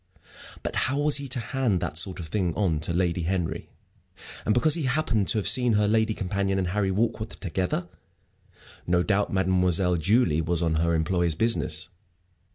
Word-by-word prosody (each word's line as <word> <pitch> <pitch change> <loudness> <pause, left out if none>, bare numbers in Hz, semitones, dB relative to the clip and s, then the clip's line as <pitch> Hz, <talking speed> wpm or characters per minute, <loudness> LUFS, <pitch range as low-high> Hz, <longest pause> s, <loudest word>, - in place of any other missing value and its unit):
But - - -4
how 140 - -1
was 145 0 +2
he 140 -1 -5
to 125 0 -1
hand 115 -4 -1
that - - -4
sort 90 +3 +2
of 85 - -5
thing 90 -3 -1
on 85 -4 0
to 80 +3 -2
Lady 90 0 0
Henry? 85 0 -3 0.8
and - - +3
because 145 +8 +3
he 165 -4 +1
happened 130 -7 0
to - - +2
have 105 - -1
seen 125 -2 +4
her 105 0 +2
lady 110 0 +1
companion 100 0 -1
and 95 -2 -1
Harry 100 +1 0
Warkworth 110 +2 -2
together? 90 -1 -2 1.0
No 90 0 +2
doubt 105 0 0
Mademoiselle 90 -1 +2
Julie 90 -2 +2
was 85 +1 -1
on 80 -1 0
her 85 +1 +1
employer's 85 0 0
business. 85 -6 -1
95 Hz, 175 wpm, -26 LUFS, 85-110 Hz, 1.0 s, seen